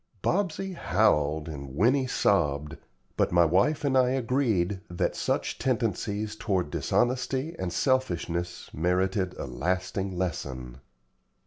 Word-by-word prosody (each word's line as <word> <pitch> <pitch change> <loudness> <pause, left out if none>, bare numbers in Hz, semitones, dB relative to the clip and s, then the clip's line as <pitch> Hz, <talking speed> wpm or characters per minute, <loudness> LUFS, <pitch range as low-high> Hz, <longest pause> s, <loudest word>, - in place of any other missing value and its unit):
Bobsey 190 0 0
howled, 80 - +2
and 70 -4 -7
Winnie 130 - +3
sobbed, 75 - +1 0.4
but - - +2
my 85 -1 +5
wife 95 - +2
and 135 -2 +2
I 130 -1 +5
agreed 115 -8 +1
that 90 - -1
such - - -1
tendencies 110 -4 -1
toward 95 -8 -1
dishonesty 130 +5 0
and 90 - -2
selfishness 90 - -1
merited 90 +3 0
a - - -4
lasting 90 +7 -2
lesson. 65 -8 -4
95 Hz, 115 wpm, -28 LUFS, 85-125 Hz, 0.4 s, my